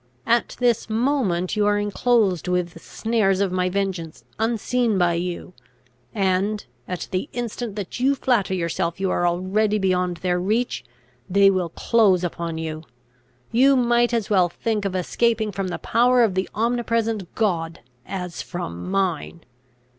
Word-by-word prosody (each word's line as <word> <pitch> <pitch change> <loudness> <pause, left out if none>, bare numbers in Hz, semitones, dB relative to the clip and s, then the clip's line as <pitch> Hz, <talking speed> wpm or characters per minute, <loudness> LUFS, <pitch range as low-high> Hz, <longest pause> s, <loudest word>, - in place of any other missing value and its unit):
At 235 0 +1
this 240 -3 +1
moment 220 -7 0
you 210 -1 +2
are 205 0 +3
enclosed 205 - +1
with 180 -1 0
the 165 - -13
snares 210 -1 0
of 200 -2 +1
my 185 0 0
vengeance 185 -4 -3 0.2
unseen 230 0 +1
by 175 -2 +3
you, 175 +1 -4 0.6
and, 195 +1 0 0.2
at 180 -1 -4
the 185 0 -2
instant 240 -2 -4
that 205 +2 -5
you 270 +3 +3
flatter 230 -8 +1
yourself 170 0 -2
you 190 -1 0
are 175 - +1
already 195 +5 +1
beyond 180 -3 0
their 180 0 0
reach, 220 +7 -1 0.5
they 195 +1 +5
will 185 -3 -1
close 195 -1 +3
upon 170 -1 -3
you. 160 -1 -4 0.7
You 270 +4 +5
might 240 -1 +3
as 230 -4 0
well 185 -4 +3
think 210 +3 -2
of 190 -1 -2
escaping 220 +4 +1
from 195 -1 -3
the 180 - -3
power 245 +1 +3
of 215 -5 +2
the 190 +1 -1
omnipresent 230 -3 -1
God, 170 -7 -1 0.3
as 180 -2 -5
from 175 - -6
mine! 185 -4 -1
195 Hz, 155 wpm, -23 LUFS, 180-230 Hz, 0.7 s, they